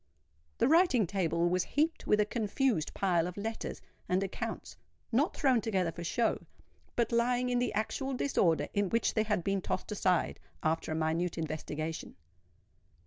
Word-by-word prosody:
The - - +3
writing 315 - +5
table 170 -2 0
was 180 +1 +1
heaped 315 - -1
with 210 - +4
a 210 - +4
confused 220 - 0
pile 175 -3 +2
of 180 - -7
letters 225 +2 -4 0.3
and 185 +2 +2
accounts—not 240 - -3
thrown 260 -5 +3
together 190 -5 0
for 170 - -7
show, 225 +7 0 0.5
but 235 0 +1
lying 245 +1 +2
in 245 0 +2
the 245 -1 0
actual 265 +5 -1
disorder 165 - +2
in 200 -2 +1
which 230 +3 +1
they 220 - +2
had 210 -5 0
been 195 +1 0
tossed 185 - -3
aside 185 -4 +1 0.2
after 160 0 0
a - - -1
minute 160 +2 0
investigation. 155 0 -4
200 Hz, 155 wpm, -31 LUFS, 170-240 Hz, 0.5 s, writing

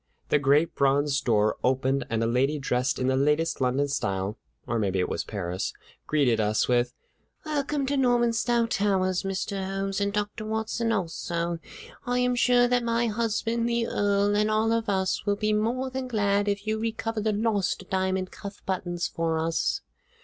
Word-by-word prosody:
The 150 - +4
great 145 +4 +3
bronze 140 +1 +2
door 110 -2 +2
opened, 130 +1 +1
and 115 0 0
a - - +2
lady 130 +6 +1
dressed 130 -1 0
in 130 - -1
the 130 0 +2
latest 150 +3 +1
London 130 +3 +2
style 100 -5 -2 0.3
(or 120 - -1
maybe 95 -3 0
it 90 - +1
was - - -2
Paris) 95 -3 -3 0.3
greeted 135 -7 +2
us 105 0 +1
with: 120 0 +1 0.5
"Welcome 290 -2 -1
to 280 +2 0
Normanstow 240 -2 +2
Towers, 190 -4 +1
Mr. 195 0 -3
Holmes, 195 +1 -2
and 200 0 +1
Dr. 210 +2 -3
Watson, 220 +1 -1
also. 170 -3 -2 0.4
I 245 0 -1
am 250 0 +2
sure 245 0 +4
that 245 0 +1
my 235 0 +1
husband 230 +1 0
the 235 0 +1
Earl 205 -1 +1
and 210 +1 +2
all 215 +1 +2
of 230 -1 0
us 190 -1 0
will 205 - +3
be 215 +1 0
more 240 +5 0
than 260 0 -3
glad 205 -3 +1
if 200 0 -1
you 215 0 -1
recover 225 0 -2
the 215 +1 +1
lost 205 -3 0
diamond 190 0 0
cuff 200 0 -9
buttons 175 -2 -2
for 165 -1 -1
us." 165 +1 0
195 Hz, 175 wpm, -27 LUFS, 140-225 Hz, 0.5 s, The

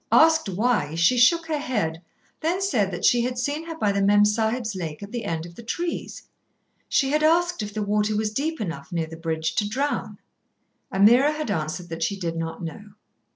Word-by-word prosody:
Asked 320 -6 +5
why, 195 -6 0
she 175 +9 +4
shook 325 +8 +4
her 310 -2 -2
head, 200 - -2 0.4
then 340 +4 0
said 245 - +1
that 175 - -3
she 240 - +5
had 250 +1 -2
seen 290 +6 -2
her 325 -1 -6
by 210 -8 +1
the 200 0 0
Mem 205 +1 +5
Sahib's 220 +1 0
lake 165 -3 -5
at 200 - -9
the 240 -3 -4
end 165 -3 -3
of 170 - -11
the 205 - -11
trees. 335 +9 -4 0.7
She 270 -2 +2
had 305 +1 +2
asked 345 0 +2
if 210 -1 -4
the 210 0 -3
water 210 +1 +1
was 215 0 -1
deep 315 +6 -2
enough, 165 -7 -5
near 165 -2 -1
the 160 +1 -10
bridge, 160 -1 -2
to 205 -1 +1
drown. 280 +6 -2 0.7
Ameerah 240 +9 +5
had 300 -8 -3
answered 165 +1 -3
that 165 0 -6
she 200 -1 -1
did 170 -2 -3
not 165 +2 -4
know. 205 +5 -8
210 Hz, 205 wpm, -24 LUFS, 175-275 Hz, 0.7 s, Asked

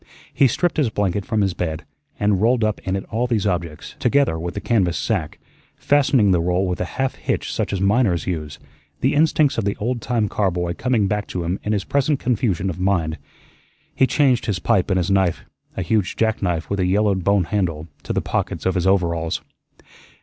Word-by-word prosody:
He 135 - +4
stripped 175 +8 0
his 145 -6 +2
blanket 100 -2 -1
from 110 -4 +1
his 95 -2 +1
bed 80 -3 -4 0.3
and 105 -2 +2
rolled 115 +1 +3
up 110 -1 0
in 95 0 -1
it 95 - -4
all 120 +3 0
these 110 -5 0
objects, 85 -5 -3
together 140 -13 +2
with 85 +1 -5
the - - -2
canvas 95 -6 +1
sack, 70 - -2 0.4
fastening 135 -7 +3
the 90 -2 +3
roll 90 +2 +1
with 90 - -2
a - - 0
half 135 0 0
hitch - - -3
such - - -2
as 95 - -1
miners 100 -4 +2
use, 75 -5 -4 0.4
the 130 - +2
instincts 150 -3 +3
of - - -1
the 100 0 -1
old 120 +2 -2
time 115 -2 0
car 100 -1 0
boy 90 -1 -2
coming 120 0 +1
back 105 +1 -1
to 90 - -4
him 85 +3 -2
in 105 - -2
his 100 -2 0
present 140 +2 +1
confusion 105 -6 0
of 90 -2 -4
mind. 85 -4 0 0.7
He 130 - +3
changed 130 -5 +2
his 105 -4 0
pipe 90 +2 +1
and 95 - +2
his 90 +1 0
knife 95 -3 +1 0.3
a 95 - -1
huge 100 +1 0
jackknife 100 -7 0
with 100 - -2
a 90 - +2
yellowed 100 -1 +1
bone 100 0 +3
handle 85 -4 -2
to - - -5
the - - 0
pockets - - -3
of 95 - +2
his 90 +1 0
overalls. 85 -4 0
100 Hz, 210 wpm, -21 LUFS, 90-115 Hz, 0.7 s, He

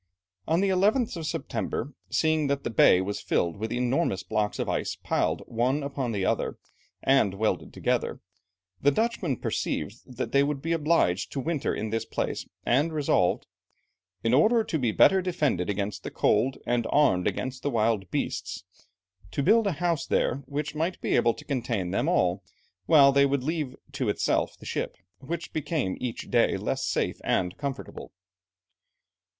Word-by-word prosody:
On 165 +3 +2
the 200 - +2
11th 210 +6 +2
of 165 -2 -4
September, 140 -1 -3 0.2
seeing 155 -2 +2
that 140 0 -1
the - - -3
bay 95 -4 +6
was 100 +2 -3
filled 85 -2 0
with 110 +2 -4
enormous 125 - 0
blocks 105 -1 -1
of - - -2
ice - - -1
piled - - -1
one 125 +5 0
upon 140 -3 -3
the 100 -3 -1
other, - - -1 0.5
and 135 -8 +3
welded 110 +2 -1
together, - - -1 0.6
the 140 - +5
Dutchmen 185 - 0
perceived 100 +6 -3 0.2
that 130 - -3
they 140 - +4
would 140 0 0
be 165 +4 -3
obliged 155 - +1
to 140 - -2
winter 150 +2 -1
in 110 0 -3
this 115 0 -1
place, - - -3 0.2
and 145 +7 +2
resolved, 140 - +1 0.8
"in 115 - +2
order 220 - +5
to 160 - -2
be 120 -4 +1
better 190 - +5
defended 150 - 0
against 100 +1 -2
the - - -5
cold, 120 +6 +1
and 120 -1 0
armed 135 -12 +3
against 130 0 -3
the 145 - -1
wild 110 -6 +1
beasts," - - -3 0.7
to 115 +10 -2
build 220 +5 +4
a 195 - +1
house 170 0 -1
there, - - +1
which 145 +2 -3
might 165 +4 -2
be - - 0
able 120 -1 +3
to - - -12
contain 115 -9 -2
them 95 - 0
all, 90 +2 +1 0.4
while 140 -3 +7
they 140 0 +4
would 140 -2 0
leave 150 -3 -2 0.2
to 140 -6 -2
itself 105 - 0
the - - -14
ship, - - -3 0.2
which 165 +5 -5
became 150 - -1
each 125 -2 -5
day - - +3
less - - -2
safe - - -1
and 90 0 0
comfortable. 140 -2 -6
135 Hz, 170 wpm, -27 LUFS, 110-155 Hz, 0.8 s, while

